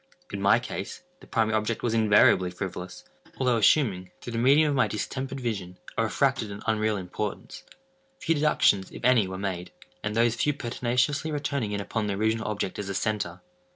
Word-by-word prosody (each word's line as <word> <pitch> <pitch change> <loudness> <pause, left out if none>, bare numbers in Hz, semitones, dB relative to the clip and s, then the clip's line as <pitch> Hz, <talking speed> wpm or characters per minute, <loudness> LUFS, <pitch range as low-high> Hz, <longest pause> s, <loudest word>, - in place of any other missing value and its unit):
In 100 - -3
my 100 +3 +5
case, 125 - -6 0.2
the - - -16
primary 110 -2 +1
object 110 +1 -1
was 115 - 0
invariably 105 -4 +5
frivolous, 90 0 -6 0.3
although 125 -3 +2
assuming, 100 -4 +3
through 120 - -7
the 115 - -1
medium 145 +5 +5
of - - 0
my 130 - +3
distempered 135 +5 -4
vision, 100 -7 -4 0.2
a - - +1
refracted 120 +2 +1
and 100 0 -8
unreal 110 -1 +1
importance. 95 +2 -5 0.6
Few 165 - +1
deductions, 145 -10 +3
if - - -8
any, 125 -6 +5
were 95 0 -5
made; 95 -2 -4 0.3
and 105 0 -2
those 115 0 +3
few 145 +5 +1
pertinaciously 125 +4 -1
returning 140 -6 -2
in 100 0 -2
upon 105 +1 -2
the 100 - -1
original 110 +2 0
object 105 -2 -3
as 100 -1 -4
a 100 - -3
centre. 100 -5 -2
110 Hz, 185 wpm, -27 LUFS, 100-125 Hz, 0.6 s, my